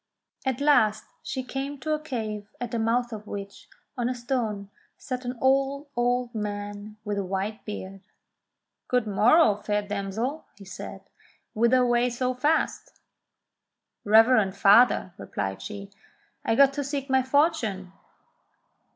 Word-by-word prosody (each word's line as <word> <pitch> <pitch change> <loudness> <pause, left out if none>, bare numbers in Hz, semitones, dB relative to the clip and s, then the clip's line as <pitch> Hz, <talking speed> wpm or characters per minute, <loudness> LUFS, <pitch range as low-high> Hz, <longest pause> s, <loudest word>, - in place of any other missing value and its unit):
At 260 -1 0
last 220 -8 +4 0.2
she 305 -6 -4
came 275 +2 -5
to 310 +2 -1
a 305 - 0
cave 220 -8 -5
at 245 -2 -4
the 235 - -1
mouth 235 +2 0
of 215 -1 -8
which, 200 -1 -8 0.3
on 245 -1 -1
a 255 - -2
stone, 225 -5 -3 0.3
sate 255 -2 -5
an 245 0 -4
old, 275 +2 +1
old 245 0 0
man 205 0 -5
with 205 -1 -2
a - - -1
white 195 +3 -3
beard. 195 -2 -7 0.9
*'Good 250 -2 +1
morrow, 215 +4 +4
fair 210 0 -1
damsel," 205 +8 -3
he 200 - -12
said, 190 - -8 0.5
"whither 235 +3 +3
away 240 0 +2
so 250 +1 -1
fast? 295 +6 -1 0.5
" - - -59 0.3
"Reverend 220 -2 +5
father," 200 -2 +5
replies 95 -1 -4
she, 200 -1 -8 0.5
"I 225 - +1
go 275 - +8
to 275 +1 -3
seek 275 0 -3
my 265 -1 +3
fortune." 255 - 0
235 Hz, 140 wpm, -26 LUFS, 205-260 Hz, 0.9 s, go